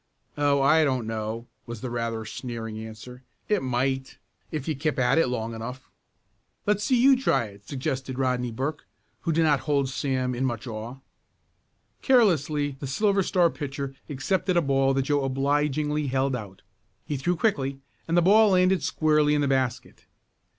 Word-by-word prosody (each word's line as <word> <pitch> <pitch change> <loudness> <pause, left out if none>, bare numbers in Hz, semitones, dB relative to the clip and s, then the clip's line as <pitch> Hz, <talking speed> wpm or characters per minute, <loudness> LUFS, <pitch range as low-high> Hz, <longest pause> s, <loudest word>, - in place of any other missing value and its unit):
"Oh, 145 -1 +2
I 155 +3 +5
don't 130 -5 0
know," 110 +1 -4 0.2
was 120 -2 -7
the 125 - -4
rather 115 -2 -3
sneering 115 -1 -6
answer. 110 +3 -9 0.3
"It 210 -2 +1
might, 130 +1 -1 0.3
if 150 -2 -5
you 155 - 0
kept 150 +2 -1
at 130 +5 +3
it 165 - +3
long 115 -2 -3
enough." 125 +4 -8 0.7
"Let's 210 0 +1
see 250 +2 +2
you 270 +2 +6
try 195 - +1
it," 100 -1 -14
suggested 135 -2 -3
Rodney 125 -2 0
Burke, 135 +6 -4 0.3
who 170 - -1
did 165 +1 +2
not 150 -3 +3
hold 140 -3 0
Sam 130 -2 -1
in 125 +2 -2
much 120 -3 -2
awe. 115 +2 -6 1.0
Carelessly 155 - +2
the 140 - -5
Silver 200 +8 +2
Star 175 -2 +2
pitcher 140 -2 -5 0.2
accepted 180 +6 0
a - - +5
ball 135 -1 +2
that 135 - +1
Joe 145 0 +1
obligingly 145 +2 0
held 135 0 0
out. 100 -5 -8 0.4
He 150 - -3
threw 175 +7 0
quickly 140 -9 0 0.3
and 165 +1 +1
the 175 - +5
ball 215 +4 +6
landed 185 0 +3
squarely 150 -1 +2
in 145 - +1
the 140 - +1
basket. 130 -2 -2
135 Hz, 170 wpm, -26 LUFS, 125-155 Hz, 1.0 s, you